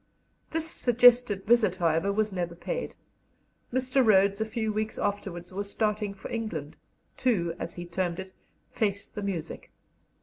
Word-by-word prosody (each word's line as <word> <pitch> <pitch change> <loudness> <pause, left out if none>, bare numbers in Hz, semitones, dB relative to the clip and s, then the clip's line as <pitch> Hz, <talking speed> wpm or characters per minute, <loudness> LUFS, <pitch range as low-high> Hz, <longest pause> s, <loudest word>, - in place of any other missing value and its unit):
This 325 0 -1
suggested 245 -7 +4
visit, 220 -5 +4
however, 170 +1 +1
was 215 0 0
never 175 -2 -3
paid; - - -4 0.8
Mr. 260 +1 +2
Rhodes 200 -1 +4
a - - +2
few 220 -1 -2
weeks 215 +1 -2
afterwards 190 -3 -3
was 200 +1 -3
starting 210 -1 -1
for 190 - -9
England, 175 -11 -4 0.4
to, 180 -10 +1
as 170 - -5
he 175 - -6
termed 175 0 -2
it, 190 0 -7 0.4
"face 200 -2 0
the 210 - -7
music." 190 -6 -4
200 Hz, 145 wpm, -28 LUFS, 180-225 Hz, 0.8 s, suggested